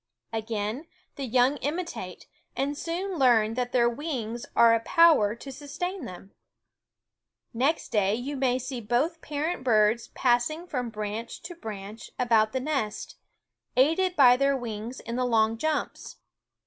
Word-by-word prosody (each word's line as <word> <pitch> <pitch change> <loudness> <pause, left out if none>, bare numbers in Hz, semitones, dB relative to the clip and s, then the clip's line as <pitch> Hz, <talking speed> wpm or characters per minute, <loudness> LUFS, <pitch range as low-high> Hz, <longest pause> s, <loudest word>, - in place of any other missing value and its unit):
Again 220 +5 -3 0.3
the 275 - -4
young 255 +3 +3
imitate, 330 +6 -5 0.3
and 280 +2 -1
soon 345 +3 -3
learn 225 -4 +4
that 245 0 -2
their 240 -2 +3
wings 240 -3 -4
are 230 -1 +6
a 230 - +3
power 230 -6 +4
to 270 +4 -9
sustain 300 +5 -5
them. 190 0 -10 1.2
Next 270 +7 0
day 205 -1 +2
you 265 +5 -4
may 260 -2 +1
see 255 -1 -5
both 270 +10 0
parent 300 0 -3
birds 220 -1 +3
passing 255 +7 +1
from 250 -8 -3
branch 215 +1 -5
to 345 +1 -7
branch 215 - -8
about 225 -3 +3
the 260 - -1
nest, 255 -7 -3 0.6
aided 330 +7 +3
by 250 -5 +7
their 275 +1 +2
wings 230 0 -6
in 235 +1 -5
the 255 - +1
long 225 -2 +2
jumps. 310 0 -3
250 Hz, 145 wpm, -27 LUFS, 225-290 Hz, 1.2 s, by